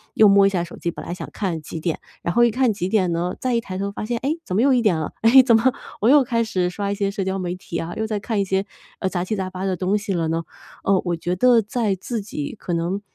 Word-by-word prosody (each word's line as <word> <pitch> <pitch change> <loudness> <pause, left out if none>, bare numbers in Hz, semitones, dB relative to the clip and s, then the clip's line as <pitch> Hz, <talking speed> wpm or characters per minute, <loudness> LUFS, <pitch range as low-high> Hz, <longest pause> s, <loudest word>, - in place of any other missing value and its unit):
又 215 - +7
摸 200 0 +6
一 - - +3
下 180 -3 -1
手 175 - -9
机， 170 - -2
本 - - -9
来 - - -4
想 180 - -7
看 180 -6 -2
几 155 +2 -7
点， 160 0 -2 0.2
然 170 - -1
后 240 +1 +5
一 235 - +5
看 250 +1 +2
几 185 -2 -3
点 190 -4 +2
呢， 170 +2 -1
再 255 -1 -1
一 230 - +2
抬 185 -5 -6
头 200 +1 -2
发 205 - -5
现， 240 +2 -1
哎， 280 - +1
怎 185 - -3
么 210 - +3
又 275 0 +5
1 245 - +3
点 205 -7 +2
了， 155 - -4
哎， 235 +4 +8
怎 235 -2 +5
么 235 +4 +4 0.3
我 220 - +4
又 285 0 +7
开 235 -2 0
始 185 -5 0
刷 200 +1 -3
一 - - -1
些 200 -1 -1
社 200 -1 -3
交 190 +1 -2
媒 180 -1 -2
体 180 -2 -6
啊， 165 +1 -4
又 220 0 -1
在 215 -2 -2
看 210 +1 -2
一 - - +2
些， 190 +1 0 0.3
呃， - - -1
杂 175 -2 -2
七 200 +4 -2
杂 190 -2 -3
八 185 +1 -5
的 190 -1 0
东 190 +3 0
西 205 -1 -3
了 165 -2 0
呢？ 165 +1 -1 0.4
呃， 195 -1 +3
我 175 -1 0
觉 175 +2 -2
得 240 +4 +5
在 215 -1 -1
自 220 +4 -4
己 150 -7 -5
可 180 - -6
能 170 +4 -1
195 Hz, 320 characters per minute, -22 LUFS, 180-225 Hz, 0.4 s, 哎